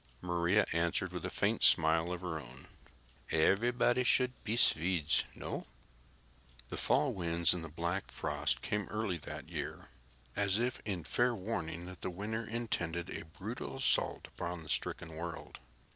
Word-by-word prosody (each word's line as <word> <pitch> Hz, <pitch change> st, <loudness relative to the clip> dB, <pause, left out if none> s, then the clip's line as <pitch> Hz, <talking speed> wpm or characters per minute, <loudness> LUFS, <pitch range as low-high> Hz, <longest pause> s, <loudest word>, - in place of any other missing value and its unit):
Maria 85 Hz, +3 st, +2 dB
answered 85 Hz, 0 st, +1 dB
with -, -, -4 dB
a -, -, -2 dB
faint -, -, +1 dB
smile 80 Hz, +2 st, +5 dB
of 90 Hz, 0 st, -3 dB
her 85 Hz, -4 st, -3 dB
own. 65 Hz, -1 st, -11 dB, 0.6 s
"Everybody 120 Hz, +9 st, +3 dB
should 125 Hz, 0 st, +4 dB
be 110 Hz, +2 st, -1 dB
Swedes. 85 Hz, -6 st, +4 dB
No?" -, -, -5 dB, 1.0 s
The -, -, -4 dB
fall 140 Hz, -2 st, +2 dB
winds 85 Hz, -2 st, +3 dB
and 90 Hz, -2 st, -4 dB
the 80 Hz, -, -6 dB
black 85 Hz, +5 st, -2 dB
frost -, -, -1 dB
came 105 Hz, -1 st, -1 dB
early 105 Hz, -5 st, -1 dB
that -, -, -7 dB
year, -, -, -5 dB, 0.5 s
as 100 Hz, -1 st, +2 dB
if 120 Hz, +2 st, -1 dB
in 95 Hz, -6 st, -2 dB
fair 120 Hz, +8 st, +2 dB
warning 90 Hz, -5 st, -3 dB
that 90 Hz, -1 st, -10 dB
the -, -, -2 dB
winter 105 Hz, +5 st, -3 dB
intended 90 Hz, -7 st, -2 dB
a -, -, -5 dB
brutal 100 Hz, +12 st, -6 dB
assault 135 Hz, -1 st, +2 dB
upon 85 Hz, -1 st, -5 dB
the 75 Hz, -, -11 dB
stricken 80 Hz, +2 st, -2 dB
world. 85 Hz, 0 st, -6 dB
90 Hz, 155 wpm, -34 LUFS, 85-110 Hz, 1.0 s, smile